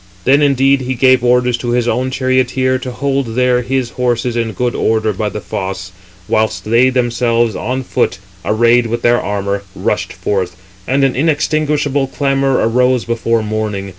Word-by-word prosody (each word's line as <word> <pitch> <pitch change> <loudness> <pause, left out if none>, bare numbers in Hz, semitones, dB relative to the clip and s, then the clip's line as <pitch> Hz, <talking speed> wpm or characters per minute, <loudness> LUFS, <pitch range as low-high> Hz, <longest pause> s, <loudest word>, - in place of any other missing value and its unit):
Then 140 +6 +4
indeed 135 -1 +3
each 130 0 -3
gave 130 0 +4
orders 125 0 +2
to 120 0 -2
his 120 -1 +1
own 130 +2 0
charioteer 130 0 0
to 130 - -6
hold 135 -3 -2
there 125 0 +2
his 125 0 -2
horses 120 -1 -1
in 115 -2 -1
good 125 +1 -1
order 110 -1 0
by 105 +2 -2
the 105 - -5
fosse; 95 -1 -5 0.4
whilst 110 0 0
they 115 +4 +4
themselves 120 -2 +1
on 130 +1 -3
foot 105 - 0 0.3
364, - - -1
arrayed 115 +2 +3
with 120 +1 -3
their 120 0 +3
armour, 100 0 -2
rushed - - -2
forth; 95 -3 -2 0.3
and 135 +2 +1
an 135 -2 +2
inextinguishable 150 -1 0
clamour 135 -2 +1
arose 125 +1 +2
before 115 -1 0
morning. 105 -2 -3
125 Hz, 165 wpm, -15 LUFS, 115-130 Hz, 0.4 s, Then